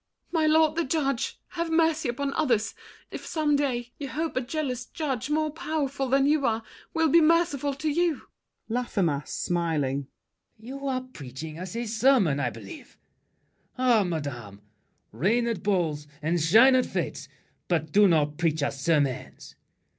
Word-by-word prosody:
My 320 -2 +2
lord 315 0 +4
the 335 - +2
judge, 275 -4 -1
Have 335 -2 -3
mercy 320 -3 +2
upon 275 +3 -2
others, 235 -8 +1 0.4
if - - -7
some 305 -3 +1
day 245 -4 -1
You 285 - -4
hope 315 +4 -3
a 255 - +1
jealous 255 -2 -3
judge, 275 -6 -3
more 310 0 +1
powerful 285 -4 -2
Than 270 +1 +3
you 295 0 +2
are, 225 -3 0 0.3
will 325 0 +2
be 335 +3 +5
merciful 310 -4 +2
to 305 +3 -4
you! 330 0 +1 0.4
LAFFEMAS 195 - -1
(smiling). 150 -6 -1 0.5
You're 260 +3 -4
preaching 155 - -9
us 185 +3 -6
a 235 +1 -2
sermon, 220 - +3
I 130 -3 0
believe! 110 -4 -11 0.8
Ah, 245 -4 +4
madame, 125 - -5 0.5
reign 230 +8 +1
at 230 -7 -2
balls 165 -7 0
and 165 +3 0
shine 225 +12 +6
at 255 -1 +3
fêtes, - - -4 0.4
But 160 -3 0
do 205 +3 +6
not 150 -3 +1
preach 160 -3 +1
us 140 -1 -2
sermons. 145 -6 -1
240 Hz, 150 wpm, -26 LUFS, -, 0.8 s, shine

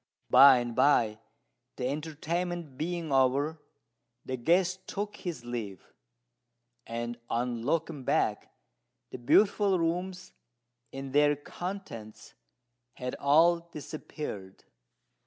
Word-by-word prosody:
By 135 -2 +9
and 120 -1 -3
by, 115 -7 +3 0.6
the 125 - -2
entertainment 160 +2 -3
being 165 +1 -3
over, 140 +4 +2 0.6
the 130 - -3
guest 180 +8 +1
took 205 +1 -4
his 165 -10 -6
leave; 110 -6 -6 0.9
and 120 +1 -4
on 120 0 -1
looking 150 +2 -1
back - - 0 0.6
the - - -7
beautiful 200 - +3
rooms 180 +2 -2 0.6
and 135 0 -7
their 145 0 +4
contents 145 - -8 0.6
had 125 0 -5
all 165 +5 +5
disappeared. 145 - -7
145 Hz, 100 wpm, -29 LUFS, 125-170 Hz, 0.9 s, By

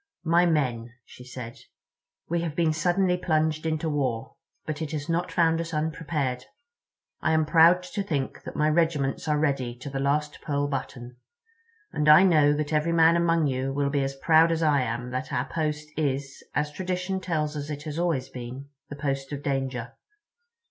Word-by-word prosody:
"My 170 +2 +4
men," 125 -7 0
she 125 - -13
said, 125 0 -8 0.7
"we 170 +1 0
have 165 -3 -4
been 165 -2 +2
suddenly 180 +3 +1
plunged 155 -2 0
into 160 +1 -1
war. 135 -7 -2 0.3
But 155 0 -4
it 155 -1 -4
has 150 0 -4
not 170 +1 -1
found 165 -1 +2
us 165 -1 -5
unprepared. 150 -4 -2 0.8
I 160 - +1
am 160 -1 +3
proud 170 +3 +5
to 190 +3 -4
think 145 -9 -3
that - - -9
my 150 - +2
regiments 155 -3 +1
are 150 -1 +2
ready 135 -5 0
to 130 +3 -8
the 135 - -3
last 150 +2 -1
pearl 145 -1 -1
button. 125 -3 -5 0.8
And 150 0 +2
I 155 +5 +9
know 155 -6 +5
that 150 +1 -1
every 155 +2 +1
man 165 0 +5
among 170 -2 +2
you 135 -1 -1
will 140 0 0
be 140 -1 +1
as 135 0 -2
proud 160 +3 +4
as 165 0 0
I 145 -3 +3
am 120 0 -3
that 130 +1 -4
our 125 - 0
post 150 0 -3
is, 140 -2 -2
as 150 0 0
tradition 185 +2 -3
tells 155 -4 -2
us 145 0 -5
it 145 -1 -5
has 155 +1 -5
always 165 -7 0
been, 125 +3 -8 0.2
the 145 - -6
post 135 -1 -3
of 145 0 -5
danger. 130 -4 -2
150 Hz, 185 wpm, -26 LUFS, 135-165 Hz, 0.8 s, I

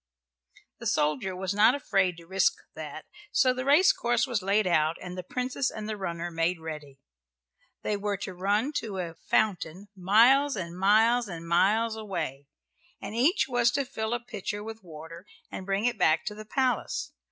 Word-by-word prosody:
The - - -4
soldier 150 +5 0
was 190 +1 -2
not 215 +5 +5
afraid 195 -10 +1
to 170 - -13
risk 190 +1 +2 0.2
that, 155 0 -8 0.3
so 255 -1 +3
the 255 0 -4
race 320 +8 +6
course 240 +3 +1
was 240 -6 -1
laid 200 +2 +2
out, 160 -2 +2
and 180 -1 -7
the 185 - -4
Princess 250 +7 -2
and 215 -1 -7
the 215 - -3
runner 175 -3 -4
made 165 +1 0
ready. 150 -4 -8 0.9
They 210 - 0
were 205 0 -2
to 190 0 -6
run 205 +10 0
to 205 -4 -4
a 175 -3 -4
fountain 190 0 -1
miles 235 +9 +4
and 170 -3 -5
miles 220 +5 +4
and 170 -3 -7
miles 215 +6 +2
away, 170 -10 -5 0.5
and - - -7
each 280 - +2
was 245 -2 +3
to 280 -1 0
fill 220 -3 -3
a - - -2
pitcher 205 -3 -5
with 225 0 -8
water 165 +2 -11 0.2
and 190 - -7
bring 195 +3 0
it 240 -3 0
back 155 0 +3
to 210 - -3
the 215 +1 -10
palace. 260 +3 -1
200 Hz, 180 wpm, -28 LUFS, 175-230 Hz, 0.9 s, race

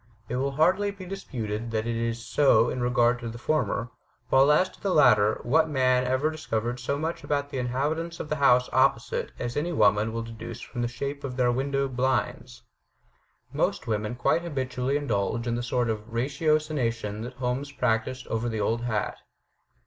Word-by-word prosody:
It 125 - -2
will 135 +1 -1
hardly 185 +7 +3
be 200 -2 -8
disputed 120 - -4
that 110 -1 -1
it 120 0 -1
is 115 0 -2
so 120 -5 +4
in 125 - -3
regard 120 0 +2
to 115 -1 -5
the 115 - -7
former; 125 -3 -1 0.4
while, 135 +2 +5
as 180 +5 +4
to - - -20
the 200 - -1
latter, 110 -7 +5
what 160 +6 +3
man 130 -3 +2
ever 130 +5 +1
discovered 120 -6 -3
as 120 - -9
much 160 +3 -3
about 145 -1 -1
the 135 - -2
inhabitants 150 +7 -2
of - - -4
the 155 - -2
house 125 -3 +4
opposite 130 -3 +1
as 120 0 -4
any 155 +4 -1
woman 105 -5 +3
will 115 0 -3
deduce 115 0 -8
from 120 0 -6
the 120 - +1
shape 140 +4 -5
of 130 -2 -5
their 125 -1 +3
window 135 +2 0
blinds. 125 -1 -2 0.9
Most - - 0
women 110 0 -2
quite 120 +7 +2
habitually 130 -4 -1
indulge 115 -4 -1
in 120 - -1
the 120 - -1
sort 120 0 0
of 110 0 -4
ratiocination 130 -5 0
that 120 +3 -6
Holmes 130 +2 -3
practised 125 0 -1
over 115 +2 -2
the 110 -1 -3
old 115 +3 0
hat. 110 -4 -2
125 Hz, 185 wpm, -27 LUFS, 115-140 Hz, 0.9 s, while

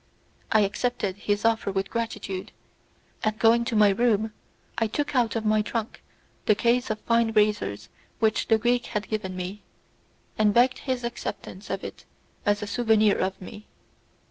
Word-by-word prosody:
I 215 - +5
accepted 205 -1 -1
his 205 +1 -1
offer 225 -3 +2
with 195 0 -2
gratitude, 215 -5 -4 0.7
and 215 0 0
going 230 +1 +4
to 235 -2 -2
my 210 -1 +6
room 220 0 +1 0.5
I 225 - +2
took 285 +6 -2
out 240 -3 +2
of 225 -1 -2
my 215 0 +3
trunk 225 +1 -4 0.5
the 215 - +5
case 240 +3 +1
of 215 0 -2
fine 230 -1 +2
razors 210 - +1 0.3
which 220 -1 +1
the 225 - +5
Greek 240 +2 +1
had 210 -2 -3
given 200 -4 -3
me, 185 +3 -5 0.8
and 215 -1 +5
I - - +9
begged 255 0 -3
his 255 -2 -3
acceptance 210 -4 -6
of 195 0 -3
it - - -8 0.4
as 205 0 +2
a - - -2
souvenir 220 -2 +3
of 190 0 -1
me. 210 +3 -10
215 Hz, 170 wpm, -26 LUFS, 205-235 Hz, 0.8 s, I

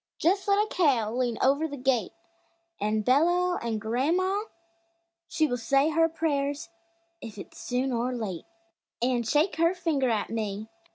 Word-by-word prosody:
Just 385 +5 +1
let 400 0 +4
a 420 - +3
cow 260 - +1
lean 245 -2 -1
over 280 +4 +3
the 285 -2 -7
gate 255 -2 0 0.7
An' 215 +1 0
bellow, 350 - +3
an' 230 -2 -2
gran'ma 335 - 0 0.8
she 315 - +1
Will 245 -5 -1
say 275 +5 +2
her 325 +1 +3
prayers, 290 -3 -2 0.5
if 220 -2 -9
it's 195 - -10
soon 255 +2 -1
or 240 +1 -1
late, 215 -8 -4 0.6
An' 245 -1 +2
shake 295 - +1
her 335 +3 +3
finger 315 -8 0
at 220 -2 -1
me! 215 -1 -3
270 Hz, 155 wpm, -27 LUFS, 230-325 Hz, 0.8 s, let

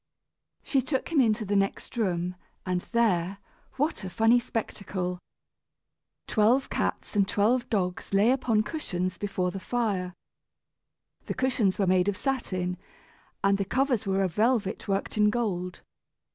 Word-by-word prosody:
She 270 - +2
took 265 +1 -2
him 300 -4 +5
into 220 -2 +2
the 205 +1 0
next 195 +4 -1
room, 180 -5 -1 0.3
and 180 -1 0
there 195 -6 +2 0.4
what 290 -3 -1
a 190 - -4
funny 225 +5 +4
spectacle! 190 -6 -3 1.1
Twelve 235 +5 +2
cats - - -2
and 200 -1 +3
twelve 235 +6 +2
dogs 180 -4 -1
lay 200 +4 +4
upon 230 -5 +2
cushions 185 - -3
before 195 -3 -1
the 195 - -5
fire. 195 -5 -1 1.1
The - - -2
cushions 250 -7 +1
were 200 - +2
made 185 0 +3
of 200 -2 0
satin, 185 -9 -2 0.7
and 195 0 +3
the - - +2
covers 255 0 0
were 195 0 +2
of 185 -3 -1
velvet 220 -2 +1
worked 195 +2 -1
in 210 0 +5
gold. 190 -6 -2
205 Hz, 145 wpm, -28 LUFS, 185-235 Hz, 1.1 s, him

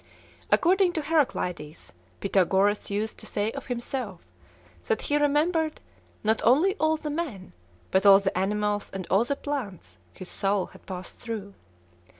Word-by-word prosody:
According 370 0 +4
to 315 - -2
Heraclides, 180 - -1 0.3
Pythagoras 195 +1 +2
used 210 +2 -2
to - - -9
say 210 +2 -1
of 275 +1 -8
himself, 240 -5 -4 0.7
that 220 - 0
he 290 - +1
remembered 310 +2 +1 0.4
"not 220 +1 +2
only 300 - +5
all 315 -1 +2
the 300 -1 -5
men, 280 - -4 0.4
but 190 - +3
all 200 -1 +9
the 195 -1 -2
animals 205 +2 0
and 190 -2 -4
all 200 +5 +4
the 280 - -1
plants, 200 - -5
his 185 - -10
soul 195 0 0
had - - -17
passed 185 -1 -7
through." 215 -4 -6
215 Hz, 150 wpm, -27 LUFS, 195-295 Hz, 0.7 s, all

